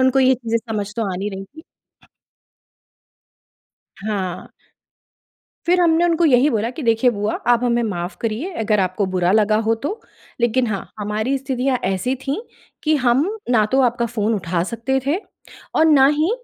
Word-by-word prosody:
उनको 260 +1 +3
ये 260 0 +5
चीज़ें 230 -2 -1
समझ 215 -3 -5
तो 230 - 0
आ - - -3
नहीं 200 +3 -3
रही 195 0 -6
थी। 315 +10 -15 2.4
हाँ। 190 -4 -3 1.2
फिर 360 +1 +3
हमने 335 0 +4
उनको 340 -1 +2
यही 270 -1 +5
बोला 225 0 0
कि 285 +4 -7
"देखिए 230 +1 +3
बुआ, 210 -1 -2
आप 240 0 +3
हमें 240 -1 +2
माफ़ 180 -4 -3
करिए 235 - -3
अगर 210 -1 +2
आपको 185 +2 0
बुरा 180 -1 +2
लगा 215 0 +3
हो 225 - +3
तो। 295 - -5 0.4
लेकिन 240 +2 +2
हाँ, 205 -4 -4
हमारी 215 +6 -1
स्थितियाँ 265 -1 -1
ऐसी 190 +7 0
थी 285 +11 -2 0.4
कि 310 0 +2
हम 250 +6 +3 0.2
ना 225 -4 +4
तो 270 - +4
आपका 240 -1 +1
फ़ोन 225 -1 -1
उठा 170 -3 -1
सकते 265 +4 -1
थे 295 - +2 0.6
और 315 - +4
ना 275 -4 +6
ही 320 +6 +2
235 Hz, 170 wpm, -20 LUFS, 210-270 Hz, 2.4 s, ना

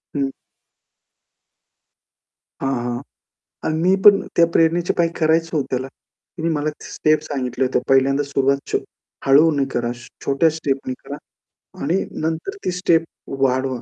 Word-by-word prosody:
हं. 140 -1 0 2.3
हां, 135 0 0
हां. 120 0 -3 0.6
अन 155 - 0
मी 185 +2 +4
पण 205 -1 +8 0.2
त्या 170 - +6
प्रेरणेचे 165 +1 +2
पायी 170 -1 +3
करायचं 165 +1 +2
हो 145 - +2
त्याला. 130 +1 -2
तिने 165 +4 -8
मला 150 +1 -1 0.2
स्टेप 155 0 +1
सांगितल्या 130 -3 -2
होत्या. 125 - 0
पहिल्यांदा 135 +1 +3
सुरुवात 135 0 +3 0.2
छो - - +3 0.5
हळूने 145 +1 +5
करा, 120 0 0
छ 120 0 -12 0.2
छोट्या 140 +4 +3
स्टेपनी 135 -4 -2
करा 145 - -6 0.7
आणि 170 +7 +1 0.2
नंतर 165 - -3
ती - - 0
स्टेप 175 -2 +2 0.4
वाढवा, 130 -1 +1
145 Hz, 135 wpm, -21 LUFS, 135-165 Hz, 2.3 s, पण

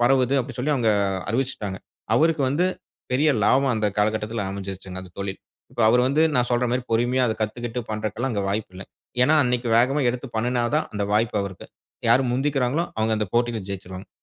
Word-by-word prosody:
பரவுது, 130 +1 +3
அப்படின்னு 125 0 -7
சொல்லி 145 +5 +1
அவங்க 115 -4 +2 0.4
அறிவிச்சிட்டாங்க. 115 -6 -2 0.4
அவருக்கு 160 -2 +3
வந்து 150 +7 +1 0.5
பெரிய 145 +5 +3 0.2
லாபம் 135 +3 +3
அந்த 110 -1 +1
காலகட்டத்தில 105 +1 0
அமைஞ்சிருச்சுங்க 95 -1 -6
அந்த 90 - -12
தொழில். 100 -1 -4 0.3
இப்போ 120 - -2
அவர் 125 +2 +4
வந்து 145 +4 +2
நான் 125 -2 +2
சொல்ற 120 0 +2
மாதிரி 125 0 -1
பொறுமையா 125 +3 +2
அத 110 - 0
கத்துக்கிட்டு 120 +2 -3
பண்ணுறதுக்குலாம் 110 +4 -2
அங்க 100 -2 -1
வாய்ப்பு 100 -1 -2
இல்ல. 95 - -8 0.4
ஏன்னா 155 +3 +4
அன்னைக்கு 125 -1 0
வேகமா 135 +5 +3
எடுத்து 125 +2 -6
பண்ணுனா 120 +2 0
தான் 155 - 0
அந்த 105 -1 -1
வாய்ப்பு 110 0 +1
அவருக்கு. 100 -2 -7 0.4
யார் 130 +3 +5
முந்திக்கிறாங்களோ 135 +3 0
அவங்க 110 0 +2
அந்த 105 - -2
போட்டியில 120 -1 +1
ஜெயிச்சிருவாங்க. 95 -1 -7
120 Hz, 175 wpm, -24 LUFS, 105-130 Hz, 0.5 s, யார்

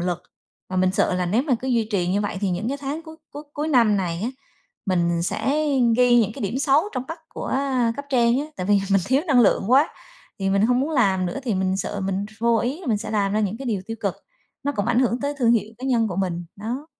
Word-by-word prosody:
lực 175 0 -2 0.5
và 185 - -3
mình 185 0 +2
sợ 195 - +1
là 180 0 0
nếu 220 +9 +2
mà 280 -5 +1
cứ 265 - -4
duy 230 -3 +1
trì 180 -3 +1
như 195 +3 +1
vậy 205 -2 -3
thì 200 - 0
những 180 +6 -2
cái 280 +1 -3
tháng 290 +4 -4
cuối 320 -1 -11
cuối 290 - -8
cuối 300 +2 -2
năm 230 -7 +4
này 175 -3 -2
á, 240 - -1 0.6
mình 170 -2 +1
sẽ 290 - 0 0.3
ghi 245 -1 +5
những 215 -2 0
cái - - -7
điểm 205 +6 -2
xấu 280 +1 +3
trong 255 - -1
mắt 325 +1 -6
của - - -4 0.4
cấp 285 - -5
trên 240 -1 +3
á, 300 - -4
tại 185 - -4
vì 205 -1 +4
mình 195 - +4
thiếu 270 +4 +2
năng 270 -6 +4
lượng 205 -1 +3
quá. 275 +5 +5 0.5
Thì 195 -1 0
mình 195 +1 +2
hông 250 +1 +2
muốn 295 +4 -1
làm 195 -10 +2
nữa 245 - -4
thì 230 -6 0
mình 190 0 0
sợ 200 +1 -3
mình 195 +1 -2
ph 215 +2 -17
vô 235 -1 +3
ý 265 +10 -2
là 360 - -10
mình 220 -3 +2
sẽ 215 - -6
làm 200 -2 +1
ra 215 - +1
những 210 +1 -1
cái 270 - -6
điều 205 -5 -1
tiêu 225 0 -5
cực, - - -1 0.5
nó 285 - 0
cũng 205 -6 -2
ảnh 240 - +2
hưởng 245 -1 +1
tới 285 +1 -2
thương 235 -3 +4
hiệu 220 -1 0
cá 260 - -5
nhân 230 -4 +2
của 180 - -5
mình, 175 -3 -2
đó. 240 +9 -5
225 Hz, 270 wpm, -23 LUFS, 195-260 Hz, 0.6 s, ghi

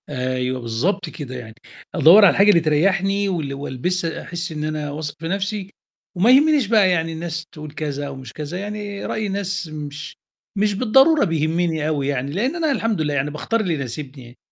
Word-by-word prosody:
أيوه 130 -1 -2
بالضبط 160 - -1
كده 140 -5 -7
يعني، 110 -3 -9 0.4
أدوّر 195 +6 +8
على 185 - +5
حاجة 200 +2 +7
بتريّحني 195 +6 +1
وال 155 -7 -2
وألبسها 160 +5 -3
أحس 175 0 -5
إن 150 -1 -4
أنا 155 -1 -3
واثق 150 0 -5
في 165 - -5
نَفْسي، 195 +1 -3 0.4
وما 200 +7 +4
يهمنيش 290 -2 +5
بقى 210 -3 +4
يعني 165 -2 0
الناس 165 0 -5
تقُول 155 -2 -9
كذا 145 -2 -4
أومش 130 -3 -9
كذا، 155 +4 -5
يعني 205 0 -5
رأي 215 -1 -2
الناس 195 -2 -3
مش 150 0 -7 0.4
مش 205 +1 +2
بالضرورة 265 +8 +4
بيهمني 160 -1 0
أوي 145 -3 -1
يعني، 140 -1 -2
لإن 240 - -1
أنا 320 -3 0
الحمد 225 - 0
لله 150 -1 -1
يعني 145 +1 -1
باختار 225 +10 -1
اللي 185 -6 0
يناسبني، 130 -2 -7
165 Hz, 175 wpm, -21 LUFS, 145-200 Hz, 0.4 s, أدوّر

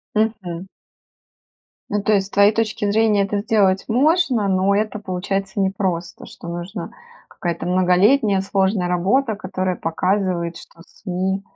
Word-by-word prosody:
Мгм. 195 -5 -2 1.2
Ну, 205 0 0
то 215 - +1
есть 195 -2 +2
с - - -15
твоей 200 +1 +5
точки 215 -2 -1
зрения 215 -1 +3
это 205 +1 -2
сделать 200 -2 +2
можно, 265 - +2
но 190 +1 +2
это 215 0 -1
получается 195 0 -3
непросто, 190 -3 -2
что - - -12
нужна 175 +2 -6 0.4
какая-то 170 -1 -4
многолетняя 190 +4 +3
сложная 195 -1 0
работа, 205 +7 +1
которая 185 -2 -3
показывает, 175 0 -1
что 165 - -15
СМИ 190 0 -3
195 Hz, 130 wpm, -20 LUFS, 185-210 Hz, 1.2 s, твоей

